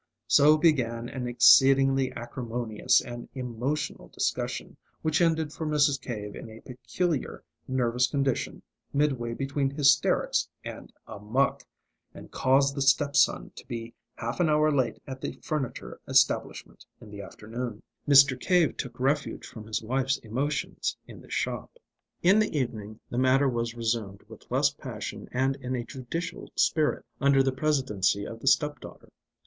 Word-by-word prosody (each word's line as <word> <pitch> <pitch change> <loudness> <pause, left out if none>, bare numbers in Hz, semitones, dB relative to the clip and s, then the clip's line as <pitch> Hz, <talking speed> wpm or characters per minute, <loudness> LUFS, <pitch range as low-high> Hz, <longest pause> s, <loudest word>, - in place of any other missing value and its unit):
So 150 +4 +6
began 120 -7 +1
an 125 -2 -5
exceedingly 135 +2 +5
acrimonious 120 0 -1
and 120 -1 -8
emotional 130 +4 -3
discussion, - - -3 0.3
which 155 +2 +1
ended 160 -2 +1
for - - -6
Mrs. 145 -2 +2
Cave 105 -4 -6
in - - -9
a 110 0 -11
peculiar 150 +4 -3 0.2
nervous 125 -1 +1
condition 135 -3 -2 0.3
midway 135 -5 0
between 135 +1 -1
hysterics 140 -1 +2 0.2
and - - -8
amuck, 110 +6 -1 0.5
and - - -12
caused 135 +1 +3
the 140 - -4
step 140 +1 +3
son - - +3
to - - -10
be 115 -1 -6 0.2
half 115 +7 -5
an 170 -3 +3
hour 155 0 +3
late 130 -4 0
at 130 -1 -8
the - - -4
furniture 150 -6 -4
establishment - - +1 0.2
in 105 - -13
the 100 -1 -7
afternoon. 110 +2 -7 0.3
Mr. 140 -2 +7
Cave 180 -2 +2
took 125 -3 -6
refuge 140 +3 -1
from 110 -1 -11
his 110 0 -3
wife's 135 +4 0
emotions 140 +7 -2
in - - -12
the - - -17
shop. - - -3 0.5
In 190 +5 +6
the 210 -7 0
evening 110 -5 -4
the 120 - -1
matter 130 +2 +4
was 120 -2 -2
resumed, 115 -4 -2
with - - -15
less - - +2
passion - - -7
and 135 +2 0
in 130 -1 -4
a 120 - -3
judicial 135 +8 -6
spirit, 155 -2 +1
under 135 -1 +4
the 135 - +1
presidency 130 -9 0
of 115 - -8
the 135 - -8
step 145 +2 +3
daughter. - - -13
130 Hz, 150 wpm, -27 LUFS, 120-145 Hz, 0.5 s, Mr